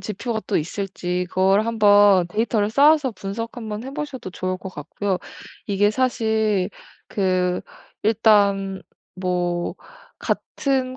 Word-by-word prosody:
지표가 220 +2 -3
또 - - +1
있을지 180 +1 -3
그걸 195 +4 +3
한번 205 -4 +5
데이터를 210 +2 0
쌓아서 285 +2 +4
분석 210 +4 -6
한번 220 -1 -5
해 270 - -7
보셔도 270 -10 -5
좋을 185 0 -3
것 190 - -8
같고요. 180 +5 -3 0.5
이게 205 +1 +2
사실 220 -6 +1 0.4
그 185 -2 0 0.4
일단 200 -3 +3 0.3
뭐 180 -1 -2 0.4
같은 260 -2 -1
205 Hz, 230 characters per minute, -22 LUFS, 185-225 Hz, 0.5 s, 한번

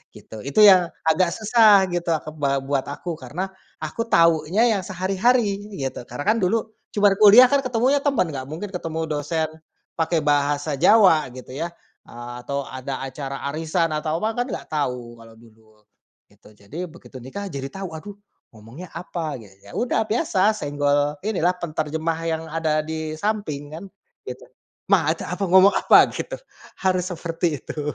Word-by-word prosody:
gitu 110 - -11
itu 140 +10 +4
yang 185 -4 +7 0.2
agak 160 +3 +3
susah 215 -2 +5
gitu 175 0 -3 0.2
ke 155 - -7
ba 140 -1 0
buat 135 -1 -1
aku 160 +3 -6
karena, 175 +10 -5 0.3
aku 230 0 -3
tahunya 165 +2 +3 0.2
yang - - -4
sehari-hari 195 +7 +1 0.3
gitu 135 -4 -4
karena 125 +4 -6
kan 215 +6 +2
dulu 220 +3 0 0.2
cuma 205 -1 +5
kuliah 220 +5 +8
kan 280 - +4
ketemunya 255 +2 +1
teman 275 - 0
nggak 130 -2 -6
mungkin 165 +8 -6
ketemu 165 -3 -5
dosen, 155 +2 -1 0.5
pakai 160 -1 +1
bahasa 145 +1 +1
Jawa 195 -7 +5
gitu 130 0 -10
ya, 155 +6 -3 0.4
ah, 120 +1 -9
atau 140 +3 -4
ada 130 0 -6
acara 135 0 -6
arisan 160 +1 -1
atau 155 +3 -2
apa 220 +2 -1
kan 245 - +1
nggak - - -9
tahu 125 -6 -3
kalau 115 0 -15
dulu, 110 -1 -22 0.5
gitu - - -21
jadi 145 - -7
begitu 160 -5 -13
nikah 190 +11 -7
jadi 135 -2 -5
tahu 190 +5 -7
aduh 190 +6 -9 0.4
ngomongnya 120 +10 -12
apa? 165 -6 -5
Ge 110 - -13 0.2
ya 100 - -14
udah 240 -2 +1
biasa 215 - +2
senggol 145 -5 0
inilah 185 -4 0
penterjemah 160 -1 -3
yang 160 0 -2
ada 155 -1 0
di 160 0 -5
samping 155 -7 -3
kan, 180 +5 -9 0.4
gitu, - - -7 0.5
“Ma, - - +4
ada - - -7
apa? 195 - -2
Ngomong 190 +2 +7
apa?” - - +5
Gitu, - - -5 0.5
harus 185 -1 +1
seperti 170 -1 -2 0.2
itu. - - -7
160 Hz, 165 wpm, -22 LUFS, 145-195 Hz, 0.5 s, kuliah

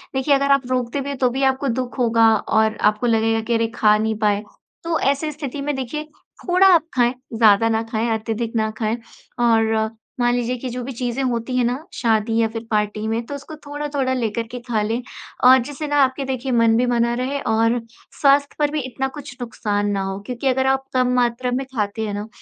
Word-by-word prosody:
देखिए, 265 +2 +2
अगर 280 0 +1
आप 275 -2 +3
रोकते 250 +2 -1
भी 275 - -5
हैं, 280 - -4
तो 255 -1 +2
भी 265 +3 -2
आपको 265 +1 +1
दुःख 255 +1 -5
होगा 230 -2 +4
और 220 0 +1
आपको 215 +3 -3
लगेगा 225 0 +2
कि, 235 +2 -2
"अरे! 230 0 +2
खा 210 -1 +4
नहीं 220 +1 -1
पाए।" 210 -1 +1 0.4
तो 330 -1 0
ऐसी 280 +3 0
स्थिति 285 -1 -6
में 290 0 -2
देखिए, 265 +4 -4 0.4
थोड़ा 365 +2 +5
आप 330 -2 +4
खाएँ, 240 -1 +3 0.2
ज़्यादा 225 -1 +5
ना 225 0 +1
खाएँ, 225 +1 0
अत्यधिक 225 +1 -4
ना 220 -1 +1
खाएँ 220 0 0 0.4
और 225 -2 +2 0.3
मान 240 0 +2
लीजिए 245 0 -1
कि 255 +1 -5
जो 250 +1 -5
भी 265 - -5
चीज़ें 245 +2 -2
होती 245 0 -2
हैं 250 - +2
ना 255 +6 -2
शादी 225 -1 +1
या 225 - +3
फिर 225 0 -6
पार्टी 210 0 0
में, 225 +1 -2
तो 285 - -6
उसको 285 +2 -9
थोड़ा-थोड़ा 290 -2 -2
लेकर 230 -2 -1
के 245 - -5
खा 220 -3 0
लें 225 +3 -1 0.4
और 255 +1 +8
जिससे 290 +3 -6
ना 290 - -1
आपके 265 +1 -1
देखिए 260 0 -3
मन 230 -2 +4
भी 245 - +2
बना 235 -1 +1
रहे 275 +2 -2
और 230 +1 +2 0.4
स्वास्थ्य 280 0 +4
पर 295 -1 +2
भी 305 - -1
इतना 260 +1 -3
कुछ 270 -3 -9
नुकसान 205 -3 -2
ना 200 -1 -1
हो। 195 0 -4
क्योंकि 250 +3 -3
अगर 265 0 +2
आप 270 0 +1
कम 255 -1 +2
मात्रा 245 0 +1
में 260 +2 -1
खाते 215 0 -1
हैं 205 - -4
ना, 205 +1 -4
245 Hz, 220 wpm, -21 LUFS, 225-270 Hz, 0.4 s, और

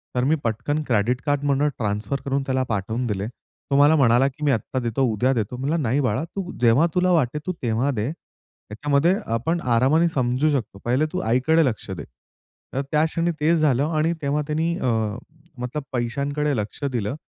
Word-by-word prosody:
तर 125 - +1
मी 150 +5 +3
पटकन 145 +7 -1
क्रेडिट 120 +1 +1
कार्डमधून 145 0 +1
ट्रान्सफर 105 +5 -2
करून 140 0 0
त्याला 130 -1 +1
पाठवून 110 +3 -2
दिले. 100 -1 -2
तो 130 +3 -7
मला 145 +2 +6
म्हणाला, 125 -1 +4
की 140 +2 -7
मी 145 - +4
आत्ता 130 +2 -1
देतो, 120 +2 -1
उद्या 125 +5 +2
देतो. 115 0 -2
म्हणला 140 +6 -1
नाही 135 -2 +1
बाळा, 130 +2 0
तू 180 +1 -6
जेव्हा 125 +7 +5
तुला 180 0 +3
वाटेल 150 -3 +1
तू 185 - 0
तेव्हा 120 +4 +1
दे. 115 +1 -2
त्याच्यामध्ये 145 - -2 0.2
आपण 160 +10 0
आरामाने 130 +8 +3
समजू 130 +1 +1
शकतो. 115 -8 -3
पहिले 130 +6 +2
तू 185 - -1
आईकडे 150 +8 +3
लक्ष 115 -5 -3
दे. 95 - -5 0.7
तर 135 - 0
त्या 150 0 +3
क्षणी 165 +2 0
तेच 160 +3 +3
झालं 145 -2 +2
आणि 160 +2 +2
तेव्हा 145 +1 0
त्यानी 160 +2 0
अ, - - -1 0.7
मतलब 125 +4 -4
पैशांकडे 140 +4 -1
लक्ष 105 +6 -5
दिलं 115 0 -2
135 Hz, 180 wpm, -23 LUFS, 120-150 Hz, 0.7 s, मला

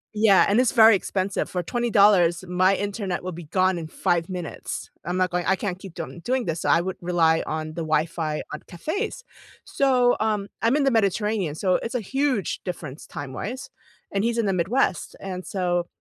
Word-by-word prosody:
Yeah, 210 -3 +5
and 205 +4 +3
it's 255 - +2
very 225 -2 +8
expensive. 190 0 -2
For 180 -1 -2
$20, 200 -5 +3
my 185 +2 +3
internet 200 -3 -3
will 185 - -4
be 170 0 -8
gone 185 +3 +1
in 160 - -6
5 170 0 0
minutes. 180 -3 -6
I'm 175 +3 -2
not 185 -1 +1
going 180 0 0
I 190 - +4
can't 185 -1 -4
keep 190 -3 -11
doin 170 +1 -7
doing 250 +6 -1
this, 165 0 -2
so - - -1
I 170 - +5
would 190 +1 -4
rely 165 -2 +2
on 155 0 -3
the 165 +2 -5
Wi-Fi 155 0 -1
on 150 - -4
cafes. 400 - -4 0.4
So, 255 -3 +3
um, 210 -2 -1
I'm 230 +4 +3
in 295 - +2
the 270 - +3
Mediterranean, 210 -5 +1
so 185 +2 +1
it's 230 - -5
a - - +2
huge 260 -1 -1
difference 155 -6 -7
time-wise, 200 - -6 0.4
and 200 0 0
he's 235 +1 0
in 230 - +1
the 195 - +1
Midwest, 185 - 0
and 185 -1 -6
so, 175 -2 -1
185 Hz, 195 wpm, -24 LUFS, 175-220 Hz, 0.4 s, very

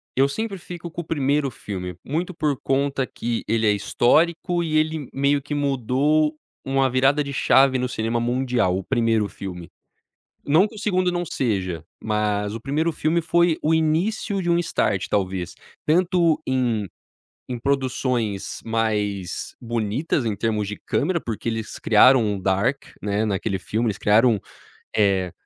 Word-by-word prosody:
eu 135 +1 +4
sempre 205 +7 -3
fico 175 -1 -8
com 170 - -4
o - - -9
1º 145 -3 0
filme, 90 -5 -6
muito 170 +6 -2
por 150 -4 0
conta 135 0 0
que 120 -2 -3
ele 110 0 +1
é - - +5
histórico 165 - +2
e 155 -2 0
ele 155 -2 0
meio 140 +1 +2
que 145 +2 -6
mudou 145 +3 +1 0.3
uma 135 0 +2
virada 135 +4 +3
de 140 - -6
chave 135 0 +4
no 125 0 -1
cinema 115 0 -1
mundial, 120 -5 +1
o 95 - -4
1º 115 0 +1
filme. 90 -4 -8 0.8
Não 160 +8 +4
que 220 - -15
o - - -9
2º 185 -4 +1
não 175 0 -1
seja, 95 - -2 0.2
mas 105 -1 -1
o 115 - -5
1º 155 +6 0
filme 160 +2 0
foi 170 0 +3
o 155 - +2
início 185 +6 0
de 175 - 0
um 170 - +3
start, 105 - 0
talvez, 95 -3 -1 0.3
tanto 170 0 +3
em 120 -6 0 0.6
em 125 -1 -4
produções 125 -5 -1
mais 105 -4 -2
bonitas 120 +4 -1
em 110 - 0
termos 105 0 -1
de 105 +1 -6
câmera, 170 +3 0
porque 115 -5 -6
eles 115 -1 -5
criaram 120 +2 +5
um 105 -2 -1
dark, 100 +9 0 0.2
né, 105 +1 0
naquele 100 -1 -1
filme, 110 +5 -2
eles 105 - -3
criaram, 110 +1 +4 0.6
eh 95 -4 +2
130 Hz, 160 wpm, -23 LUFS, 105-155 Hz, 0.8 s, é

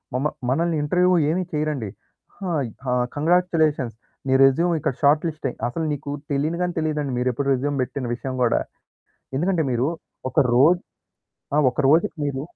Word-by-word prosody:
మమ 130 +3 -1 0.2
మనల్ని 165 +4 +1
ఇంటర్వ్యూ 180 +4 +3 0.2
ఏమీ 180 +4 0
చేయరండి. 150 -8 -1 0.5
"హాయ్! 160 -10 -1 0.2
ఆ! - - +2 0.2
కాంగ్రాచ్యులేషన్స్ 155 -6 +1 0.3
నీ 130 - +2
రెస్యూమ్ 165 +6 +3
ఇక్కడ 135 - -1
షార్ట్‌లిస్ట్ 155 +2 +2
అయి" - - -10
అసలు 160 +7 -3
నీకు 145 0 -6 0.2
తెలియని 155 +5 -1
గాని 175 -1 -3
తెలీదండి 150 -4 -1
మీరె 125 0 +1
ప్పుడు 140 -1 0
రెస్యూమ్ 140 +2 -1
పెట్టిన 130 +1 -5
విషయం 130 +1 -5
గూడా. 120 - +2 0.8
ఎందుకంటే 170 0 +1
మీరు 120 +3 +1 0.4
ఒక - - -24 0.2
రోజు 165 +8 +5 0.7
ఆ! - - +3
ఒకరోజుకి 145 +7 +2
మీరు 135 -1 -3
150 Hz, 150 wpm, -23 LUFS, 135-165 Hz, 0.8 s, రోజు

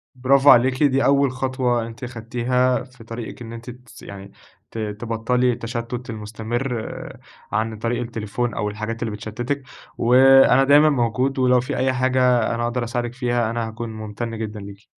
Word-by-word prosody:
برافو 135 +2 +4
عليكِ، 130 +3 +5
دي 135 -1 +3
أول 140 -1 +3
خطوة 130 -3 -1
أنتِ 115 +3 -11
أخدتيها 125 +2 0
في 125 -2 -16
طريقِك 115 +1 -8
إن 115 -1 -8
أنتِ 115 +2 -9
تس 125 -2 -13
يعني 100 0 -10 0.4
ت - - -9
تبطّلي 115 +3 -1
التشتّت 120 +1 -5
المستمر 115 +4 -4 0.8
عن 110 +1 -1
طريق 120 +2 -1
التليفون 115 0 -3
أو 105 - -2
الحاجات 110 +2 -5
اللي 115 - -3
بتشتّتِك، 120 +6 -4 0.3
وأنا 135 +2 +6
دايمًا 145 +3 +6
موجود 130 0 0
ولو 125 -1 +4
في 140 +3 -4
أي 130 0 +1
حاجة 125 -2 +2
أنا 120 - -2
أقدر 120 +1 -1
أساعدِك 120 0 -3
فيها 120 -3 0
أنا 115 -1 -2
هاكون 115 +1 -6
ممتن 110 +1 -6
جدًا 110 -1 -5
ليكِ. 100 +1 -13
120 Hz, 160 wpm, -22 LUFS, 115-130 Hz, 0.8 s, وأنا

